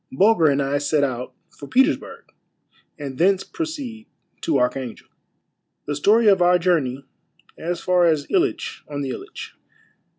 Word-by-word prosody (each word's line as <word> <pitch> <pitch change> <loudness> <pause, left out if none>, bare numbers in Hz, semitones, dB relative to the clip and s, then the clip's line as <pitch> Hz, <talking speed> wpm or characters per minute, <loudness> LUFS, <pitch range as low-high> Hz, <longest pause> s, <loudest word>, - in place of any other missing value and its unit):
— - - -49
BULGER 200 -5 +5
AND 140 -1 +2
I 140 +1 0
SET 145 0 +1
OUT 125 -2 -3 0.2
FOR 140 - -11
PETERSBURG, 265 - 0 0.6
AND 135 -3 -7
THENCE 190 +2 +3
PROCEED 280 -9 -6 0.3
TO 155 -4 +1
ARCHANGEL. 125 -1 -2 0.4
— - - -54
THE 145 - -3
STORY 215 +10 +3
OF 195 -3 +5
OUR 180 0 +5
JOURNEY 145 -7 0 0.5
AS 170 +1 -3
FAR 180 -1 +3
AS 155 -3 +1
ILITCH 400 +5 0
ON 145 -1 -5
THE 135 - -3
ILITCH. - - -8
165 Hz, 155 wpm, -22 LUFS, 140-205 Hz, 0.6 s, BULGER